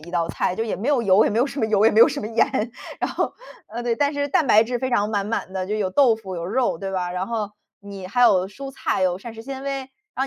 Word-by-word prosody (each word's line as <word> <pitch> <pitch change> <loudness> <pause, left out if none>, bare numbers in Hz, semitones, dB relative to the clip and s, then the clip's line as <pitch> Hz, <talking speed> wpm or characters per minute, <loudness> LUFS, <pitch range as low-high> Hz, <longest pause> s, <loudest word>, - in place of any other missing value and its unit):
一 165 +3 -12
道 170 -2 0
菜。 180 - -1
就 225 - -1
也 225 - -2
没 225 +8 -4
有 285 -4 +3
油， 200 0 +5
也 - - +1
没 215 - 0
有 250 - +3
什 285 - -7
么 220 - +1
油， 215 -1 +2
也 225 - +6
没 220 - +4
有 - - +9
什 - - -4
么 210 - -4
盐。 230 0 0 0.3
然 - - -2
后， - - -1 0.4
呃， 235 +3 -6
对， 240 -1 0
但 285 +3 +1
是 285 0 -2
蛋 300 +2 +2
白 220 -2 +6
质 245 +1 -2
非 260 +1 -2
常 210 -2 +1
满 200 -2 -1
满 210 -3 -3
的。 185 -1 -3
就 210 - -2
有 200 -3 -1
豆 240 +2 +4
腐、 195 -4 -8
有 170 -1 -4
肉， 235 -3 0
对 195 +2 -4
吧， 180 -1 -2
然 185 +1 -3
后 220 -2 -3 0.3
你 200 -2 -9
还 245 +6 -1
有 190 -5 +4
蔬 270 +7 -8
菜， 265 -7 -2
有 180 0 +1
膳 235 +3 -9
食 225 - -9
纤 270 +1 -7
维。 275 0 -2 0.4
然 265 - -1
220 Hz, 320 characters per minute, -23 LUFS, 190-245 Hz, 0.4 s, 有